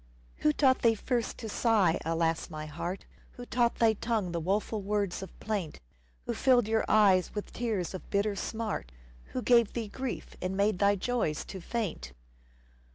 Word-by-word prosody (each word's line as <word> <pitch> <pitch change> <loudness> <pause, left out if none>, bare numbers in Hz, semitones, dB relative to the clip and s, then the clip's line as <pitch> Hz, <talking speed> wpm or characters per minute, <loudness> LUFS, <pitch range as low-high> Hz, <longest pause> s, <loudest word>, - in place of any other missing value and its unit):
Who 150 - +3
taught 260 - +3
thee 230 -1 +4
first 235 +1 -2
to 225 - -6
sigh, 210 -6 +2
alas! 165 +1 0
my 155 -2 -6
heart? 170 +5 -5 0.3
Who 245 - -9
taught 240 -1 +1
thy 225 -1 +4
tongue 215 -4 -1
the 170 - -1
woeful 205 +5 -1
words 200 -2 -1
of 190 - -10
plaint? 200 -8 -3 0.5
Who - - -1
filled 250 -4 +3
your 220 0 +2
eyes 195 -4 +4
with 210 - -5
tears 215 -8 -2
of 185 - -8
bitter 200 0 +1
smart? 215 - -3 0.3
Who 255 - -5
gave 235 -3 +4
thee 225 -3 -3
grief 260 +3 -5
and 185 +1 -2
made 200 -2 +2
thy 200 0 +4
joys 200 -7 -1
to 190 - -8
faint 170 - -3
205 Hz, 170 wpm, -30 LUFS, 180-230 Hz, 0.5 s, thee